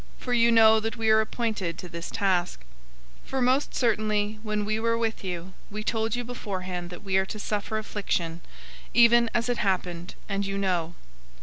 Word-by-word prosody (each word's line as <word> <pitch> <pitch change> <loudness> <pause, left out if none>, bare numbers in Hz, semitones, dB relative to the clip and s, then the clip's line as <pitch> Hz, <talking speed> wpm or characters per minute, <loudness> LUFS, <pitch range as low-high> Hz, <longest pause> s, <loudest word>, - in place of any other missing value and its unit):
For 250 - -3
you 235 -1 +5
know 220 -1 +7
that 225 0 -3
we 220 -1 +2
are 220 0 +6
appointed 215 -7 -2
to 180 - -7
this 170 0 -6
task. 180 - 0 0.6
003:004 - - -18
For 265 - -1
most 260 +3 +2
certainly, 215 -3 +1
when 210 -1 -2
we 215 +1 0
were 230 0 +1
with 225 -2 -2
you, 180 0 -5 0.2
we 215 +1 -5
told 225 0 0
you 245 - -2
beforehand 185 -7 -5
that 175 +2 -10
we 190 -1 +1
are 190 - +2
to 215 - -6
suffer 210 +1 -2
affliction, 175 -6 -2 0.5
even 235 0 +6
as 235 0 +1
it 245 -1 0
happened, 180 -3 -1
and 200 -1 -1
you 195 0 -3
know. 175 -4 -1
210 Hz, 190 wpm, -27 LUFS, 185-230 Hz, 0.6 s, know